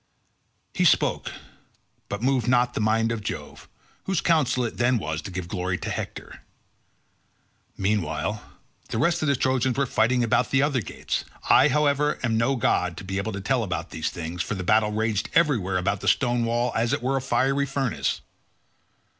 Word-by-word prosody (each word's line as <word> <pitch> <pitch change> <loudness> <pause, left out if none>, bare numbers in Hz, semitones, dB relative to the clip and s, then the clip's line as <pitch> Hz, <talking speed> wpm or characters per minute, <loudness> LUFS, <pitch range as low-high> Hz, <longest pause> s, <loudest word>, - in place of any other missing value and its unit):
He - - +1
spoke, - - +2 0.8
but 100 +3 -4
moved 130 -2 +1
not 125 0 +3
the - - -3
mind 110 +1 +2
of 115 -2 -3
Jove, - - -7 0.4
whose 190 -4 0
counsel 135 -7 +2
it 115 - -5
then 120 +1 +3
was 80 -6 -3
to - - -7
give 90 -2 -5
glory 90 0 -2
to - - -5
Hector. - - -6 1.4
Meanwhile 100 0 -1 0.5
the - - -3
rest 170 +8 +2
of 155 - 0
the 140 - +3
Trojans 130 0 +1
were 140 - +2
fighting 120 +1 +2
about 120 +2 +2
the 135 +1 +3
other 140 -4 +1
gates; 90 - -4 0.3
I, - - +7
however, 150 0 +2
am 115 -2 +1
no 115 +5 +2
god 90 -8 0
to - - -7
be 95 +1 -3
able 110 +2 -3
to 100 - -5
tell 125 +5 +1
about 90 -6 -3
all - - -27
these 80 -1 -2
things, 85 +1 -5
for 105 - -3
the 95 - -4
battle 110 +3 +3
raged 110 0 -1
everywhere 115 - +2
about 100 +2 -1
the - - -4
stone 120 -2 +2
wall 120 +1 0
as 115 +1 +1
it - - -1
were 135 +2 +1
a - - -1
fiery 135 +2 +1
furnace. 135 -4 -1
115 Hz, 190 wpm, -25 LUFS, 100-130 Hz, 1.4 s, I